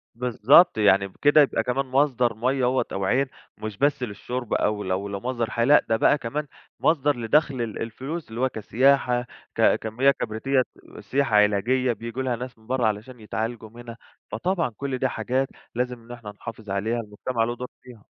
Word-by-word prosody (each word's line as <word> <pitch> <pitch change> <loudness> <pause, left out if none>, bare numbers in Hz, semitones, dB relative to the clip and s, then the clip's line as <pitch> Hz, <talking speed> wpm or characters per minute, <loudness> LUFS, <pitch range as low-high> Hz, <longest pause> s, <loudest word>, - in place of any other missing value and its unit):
بالضبط، 125 +7 +5
يعني 100 -2 +4
بكده 145 +10 +4
يبقى 135 -5 +2
كمان 130 +4 -1
مصدر 130 -3 +2
مَيّة 130 +4 0
أهوّة 125 +1 +2
أو 95 0 -2
عين، 130 +8 +2 0.3
مش 110 -1 -6
بس 140 0 +1
للشرب 120 +2 -4
أو 105 -1 0
لو 95 +2 -2
لمصدر 115 +3 -3
حياة، 115 - +1
لأ 145 +3 +5
ده 115 - +3
بقى 145 - +4
كمان 145 +4 -4 0.3
مصدر 145 -2 +2
لدخل 130 +3 +1
ال 115 -3 -4
الفلوس 135 +8 -5
اللي 115 +2 -5
هو 130 - +2
كسياحة، 125 +2 +2 0.3
ك - - +4
كمياه 120 +5 +2
كبريتية 130 +2 0
ك - - -11
سياحة 135 -5 0
علاجية 115 +5 +3
بييجوا 115 +3 -5
ليها 125 -2 0
ناس 125 +1 -7
من 110 0 -22
برّه 125 -1 0
علشان 110 +4 -4
يتعالجوا 110 +1 -4
منها، 115 0 -10 0.3
فطبعًا 170 +5 0
كُلّ 140 -2 -3
ده 130 - +1
حاجات 130 +1 -1 0.3
لازم 125 0 -2
إن 120 - -13
إحنا 120 -3 -8
نحافظ 110 0 -10
عليها، 105 +5 -1
المجتمع 115 +2 -3
له 120 +1 -2
دور 125 +1 -6 0.2
فيها. 120 -5 -14
120 Hz, 180 wpm, -24 LUFS, 110-130 Hz, 0.3 s, بالضبط